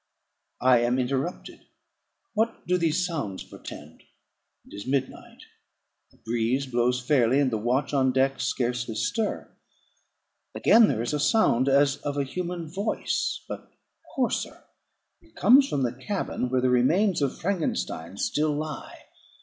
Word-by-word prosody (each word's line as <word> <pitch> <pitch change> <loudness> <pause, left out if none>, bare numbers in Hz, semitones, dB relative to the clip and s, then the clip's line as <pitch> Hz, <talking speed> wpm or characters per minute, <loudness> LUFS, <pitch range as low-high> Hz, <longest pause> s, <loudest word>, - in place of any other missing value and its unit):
I 125 -1 +5
am 120 +2 +1
interrupted. 135 +7 -3 0.7
What 225 +1 -1
do 180 - +1
these 165 +1 +1
sounds 140 - -4
portend? 75 +2 -11 0.6
It - - -17
is 100 +3 -8
midnight; 135 -1 -3 0.7
the - - -26
breeze 120 +4 -1
blows 125 0 +1
fairly, 130 -1 +2
and 135 -3 +2
the 110 - -1
watch 125 +7 0
on 130 -2 +3
deck 135 +1 +1
scarcely 120 -2 -1
stir. 220 - -2 1.0
Again; 225 -1 +6
there 115 - -1
is 120 - -3
a 150 - 0
sound 145 - +3
as 140 0 +3
of 145 0 -4
a 140 - +1
human 170 +4 -4
voice, 195 +7 -2
but - - -8 0.5
hoarser; 255 -3 -2 0.6
it 330 -1 -25
comes 265 +6 +5
from 140 - 0
the 120 -1 -1
cabin 130 -2 -3
where 130 0 +1
the 130 0 +2
remains 165 - +3
of 140 -2 -1
Frankenstein 160 - -3
still 150 +7 0
lie. 150 -1 -6
135 Hz, 140 wpm, -26 LUFS, 125-170 Hz, 1.0 s, Again